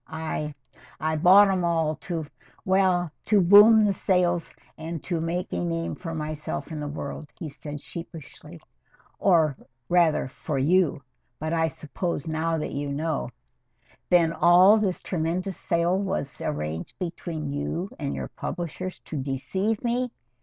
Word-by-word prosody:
I 155 -2 -4 0.4
I 155 0 0
bought 190 +6 +7
'em 185 -2 0
all 165 -2 +1
to 165 -4 -4 0.4
well, 185 -3 +2
to 210 -1 +4
boom 210 +4 +8
the 200 - +2
sales 175 -3 +1 0.2
and 160 0 -6
to 170 -3 -2
make 175 +3 -3
a - - -1
name 165 -1 -2
for 165 -2 -6
myself 155 +1 -4
in 155 - -4
the 150 - -4
world," 145 +1 -6
he 165 - -5
said 145 0 -8
sheepishly, 165 -1 -10 0.6
"or 160 -7 +4 0.3
rather 170 -5 +3
for 140 +2 -4
you 155 0 +2 0.3
but 155 +2 -3
I 160 -1 +2
suppose 155 +1 -4
now 160 +1 0
that 150 - -3
you 145 0 -3
know 150 -2 -2 0.4
" - - -35
"Then 170 -2 +4
all 180 +6 +6
this 195 -4 -1
tremendous 180 +2 -2
sale 170 +2 +1
was 190 -8 -3
arranged 75 +2 -4
between 165 -4 -4
you 165 +6 -3
and 140 -2 -3
your - - -5
publishers 180 +1 -5
to 155 - -6
deceive 190 - -2
me?" 245 +1 0
165 Hz, 150 wpm, -26 LUFS, 155-185 Hz, 0.6 s, boom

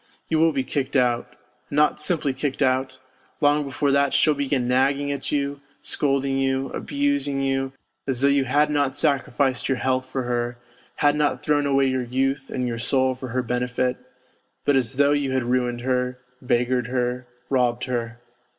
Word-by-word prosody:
You 160 - +2
will 165 0 +4
be 135 -3 -1
kicked 130 +1 -3
out. 120 -2 +1 0.3
And - - -5
not 150 0 +3
simply 150 -4 0
kicked 135 +1 -2
out; 130 0 0 0.4
long 145 0 +3
before 140 +1 -1
that 140 0 +2
she'll 155 - +4
begin 140 -3 -1
nagging 135 +3 +2
at 140 -1 -4
you, 140 -1 -1 0.2
scolding 135 -1 0
you, 135 0 0
abusing 285 - -1
you, 135 0 -1 0.3
as 130 -3 0
though 140 - +5
you 140 -1 +3
had 145 +4 +2
not 145 -2 0
sacrificed 135 -2 +1
your 135 - +1
health 130 0 0
for 130 - -2
her, 120 0 -2 0.4
had 145 0 +3
not 150 -1 0
thrown 145 -1 +2
away 135 -1 +3
your 130 -1 0
youth 135 +2 -1
and 125 -1 -2
your 115 -1 -3
soul 130 +2 +2
for 130 0 -7
her 125 +2 -1
benefit, 125 +1 -1 0.7
but 145 - +3
as 130 0 +1
though 140 +1 +4
you 145 -2 0
had 130 -1 +1
ruined 120 0 0
her, 125 0 -1 0.2
beggared 125 0 +1
her, 125 0 -2 0.2
robbed 125 -2 +1
her. 120 -2 -3
135 Hz, 180 wpm, -23 LUFS, 125-140 Hz, 0.7 s, though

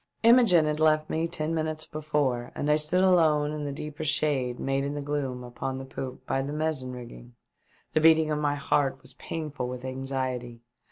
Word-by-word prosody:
Imogene 225 -9 +6
had 150 0 -1
left 155 0 +3
me 160 +1 0
ten 155 0 -3
minutes 155 -1 -1
before, 150 -6 -1
and 150 - 0
I - - +5
stood 155 +4 +1
alone 160 -5 +4
in 150 -1 -4
the 145 - -3
deeper 150 +1 -6
shade 140 -5 0
made 135 0 0
in 140 +1 -3
the 145 - -3
gloom 140 -4 -3
upon 125 +2 -5
the 135 - -6
poop 130 -1 -7
by 135 - 0
the 140 +2 -4
mizzen 150 -4 -1
rigging. - - -10 0.6
The 155 - +3
beating 160 -1 +5
of 150 - 0
my 145 -1 +1
heart 140 -1 0
was - - -10
pain 155 -2 -5
ful 125 -3 -4
with 125 0 -6
anxiety. 130 -2 -4
145 Hz, 200 wpm, -27 LUFS, 130-155 Hz, 0.6 s, Imogene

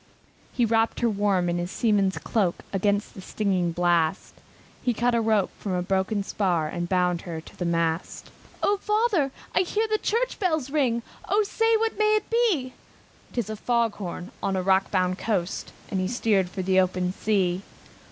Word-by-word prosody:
He 240 - +2
wrapped 225 +1 +1
her 235 - +3
warm 200 -3 +1
in 175 0 0
his 175 +1 -3
seaman's 200 -3 +1
coat 195 -6 0 0.2
Against 205 +1 0
the 190 - -9
stinging 185 -3 0
blast; 175 0 +1 0.5
He 245 -2 0
cut 240 +2 +1
a 235 - +2
rope 220 -4 +2
from 195 - -3
a 180 0 0
broken 195 +2 0
spar, 180 -6 0
And 175 +1 -4
bound 180 -2 +1
her 165 -3 -5
to 160 - -14
the 180 - -3
mast. 165 0 -1 0.3
"O 410 - +3
father! 420 -8 +1 0.2
I - - +3
hear 420 +5 +1
the 430 0 0
church 475 +3 -1
bells 315 -8 0
ring, 250 -6 +1 0.3
O 425 +1 +3
say, 450 +2 +2
what 445 -1 -1
may 430 0 +4
it 425 - -1
be?" 395 - +2 0.6
"Tis 240 -5 -2
a - - -3
fog 235 0 0
bell 180 -2 -5
on 195 - 0
a 185 - -1
rock 190 +1 +3
bound 185 -1 0
coast!" 195 -5 -2 0.2
And 190 - 0
he 185 - 0
steered 205 -4 +1
for 190 +1 -4
the 190 0 +3
open 185 -1 +1
sea. 190 -4 0
200 Hz, 185 wpm, -25 LUFS, 180-250 Hz, 0.6 s, may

